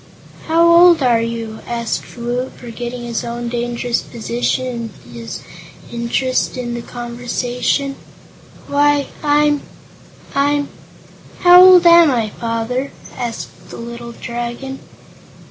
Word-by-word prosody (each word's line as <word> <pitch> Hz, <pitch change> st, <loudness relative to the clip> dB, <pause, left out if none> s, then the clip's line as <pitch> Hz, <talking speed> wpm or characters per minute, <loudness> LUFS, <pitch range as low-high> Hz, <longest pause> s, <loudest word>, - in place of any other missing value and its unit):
"How 335 Hz, +1 st, +4 dB
old 340 Hz, -2 st, +7 dB
are 235 Hz, -2 st, +3 dB
you 230 Hz, 0 st, -3 dB
now?" -, -, -13 dB
asked 235 Hz, 0 st, -4 dB
Woot, 245 Hz, +2 st, -3 dB
forgetting 240 Hz, 0 st, -7 dB
his 235 Hz, -2 st, -3 dB
own 235 Hz, 0 st, -4 dB
dangerous 240 Hz, 0 st, -2 dB
position 235 Hz, 0 st, -3 dB, 0.2 s
in -, -, -14 dB
his 115 Hz, -1 st, -7 dB, 0.5 s
interest 240 Hz, +3 st, -1 dB
in 240 Hz, -1 st, -4 dB
the 240 Hz, -, -4 dB
conversation. 245 Hz, +3 st, -2 dB, 0.7 s
"Why, 290 Hz, 0 st, +2 dB
I'm 295 Hz, 0 st, +2 dB, 0.7 s
I'm 285 Hz, +1 st, +1 dB, 0.7 s
How 355 Hz, 0 st, +9 dB
old 365 Hz, -1 st, +8 dB
am 340 Hz, -2 st, +8 dB
I, 230 Hz, -5 st, 0 dB
Father?" 230 Hz, +4 st, -3 dB, 0.2 s
asked 235 Hz, -2 st, -6 dB
the -, -, -9 dB
little 235 Hz, 0 st, -8 dB
Dragon. 240 Hz, +3 st, -5 dB
245 Hz, 115 wpm, -18 LUFS, 235-285 Hz, 0.7 s, How